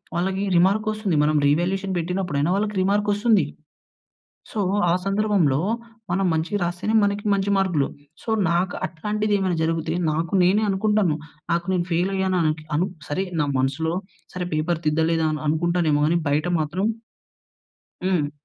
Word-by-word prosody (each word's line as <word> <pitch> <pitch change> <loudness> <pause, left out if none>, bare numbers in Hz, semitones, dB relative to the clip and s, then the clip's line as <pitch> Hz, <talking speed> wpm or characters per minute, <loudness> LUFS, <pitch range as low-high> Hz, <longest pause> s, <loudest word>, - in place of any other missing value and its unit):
వాళ్ళకి 190 +3 -1
రిమార్క్ 200 +5 +3
వస్తుంది. 210 -6 -1
మనం 155 0 +2
రీ‌వాల్యుయేషన్ 185 +5 0
పెట్టినప్పుడు 180 -2 -2
అయి‌‌నా 155 +5 +1
వాళ్ళకి 210 0 -1
రిమార్క్ 205 +2 +1
వస్తుంది. 215 +1 +3 1.1
సో, 215 - -4 0.3
ఆ - - +4
సందర్భంలో 195 -9 +2 0.5
మనం 195 +2 +1
మంచి‌‌గా 165 +6 -1
రాస్తేనే 175 +5 -2
మనకి 200 0 0
మంచి 200 0 0
మార్కులు. 175 -8 +1 0.4
సో, - - -7 0.2
నాకు 180 +2 0
అట్లాంటిది 210 +5 -2
ఏమైనా 185 -3 0
జరిగితే 160 0 -1 0.2
నాకు 165 +5 -2
నేనే 200 +4 +3
అనుకుంటాను. 195 -4 +2 0.4
నాకు 170 0 0
నేను 175 -1 0
ఫెయిల్ 175 +3 +1
అయ్యాన 190 -1 0 0.2
కు 155 - -14
అనుక్ 185 +2 -1 1.4
సరే 180 -1 -2
పేపర్ 160 +2 -1
తిద్దలే‌దేమో 160 0 +1
అనుకుంటానేమో 160 -2 +1
కాని 170 +1 +2
బయట 150 +4 +1
మాత్రం 175 +6 -1 1.2
హ్మ్. 170 -6 +1
180 Hz, 135 wpm, -23 LUFS, 160-200 Hz, 1.4 s, ఆ